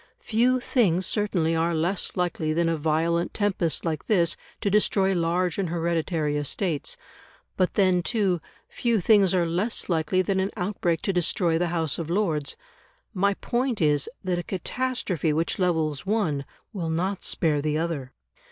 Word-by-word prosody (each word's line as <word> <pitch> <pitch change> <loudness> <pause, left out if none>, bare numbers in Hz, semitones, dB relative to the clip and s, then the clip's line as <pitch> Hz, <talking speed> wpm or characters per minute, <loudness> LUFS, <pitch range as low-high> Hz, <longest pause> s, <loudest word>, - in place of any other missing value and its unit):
Few 245 +3 +2
things 190 -8 +2
certainly 180 -7 +1
are 165 +1 +1
less 175 +5 -1
likely 165 -3 0
than 170 +1 +1
a 165 - +1
violent 165 +3 0
tempest 190 -7 0
like 155 -3 -3
this 170 -6 +3 0.3
to 200 - 0
destroy 195 -2 +3
large 175 +1 0
and 185 -4 -1
hereditary 165 -2 -1
estates. 145 +1 -2 0.6
But 185 - 0
then, 185 -3 +3
too, 190 -5 0 0.3
few 235 -3 0
things 195 -1 +4
are 175 -2 +2
less 180 +8 -1
likely 170 +2 +1
than 190 +1 0
an 190 +1 0
outbreak 180 -4 -1
to 195 - 0
destroy 170 -1 +1
the 175 - +1
House 165 -3 -1
of 165 -1 -4
Lords 170 -6 0 0.6
my 200 0 +2
point 245 +1 -1
is, 150 -3 +2
that 180 -2 0
a - - -4
catastrophe 190 - -1
which 165 +5 -1
levels 160 -6 0
one 170 -10 0 0.3
will 175 -5 -3
not 185 +4 -1
spare 150 -3 +1
the 150 +1 0
other. 155 -6 -3
175 Hz, 160 wpm, -25 LUFS, 160-195 Hz, 0.6 s, things